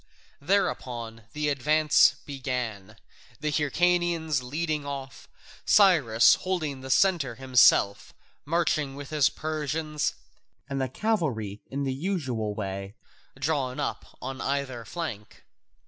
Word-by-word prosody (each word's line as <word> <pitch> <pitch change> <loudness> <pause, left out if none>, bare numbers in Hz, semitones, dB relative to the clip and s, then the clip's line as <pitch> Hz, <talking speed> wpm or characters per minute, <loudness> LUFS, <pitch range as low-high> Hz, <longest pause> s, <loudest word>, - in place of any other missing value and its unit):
Thereupon 120 - -1
the 150 0 -1
advance 150 +2 +4
began, 125 -7 -4 0.4
the 150 0 -1
Hyrcanians 160 0 +1
leading 150 +4 -2
off, 140 -1 -7 0.4
Cyrus 145 - +5
holding 155 -8 -2
the 130 - -8
centre 155 -7 +2
himself, 125 -5 +4 0.3
marching 155 -3 0
with 145 +1 -9
his 150 -4 +3
Persians, 155 0 -2 0.5
and 135 -1 -3
the 130 - -1
cavalry 130 - -1
in 140 +1 -3
the 135 -1 -1
usual 130 - -2
way, 100 0 -5 0.4
drawn 135 -2 -1
up 145 - -4
on 130 +1 -5
either 135 -4 -2
flank. 115 - -6
140 Hz, 110 wpm, -27 LUFS, 125-155 Hz, 0.5 s, Cyrus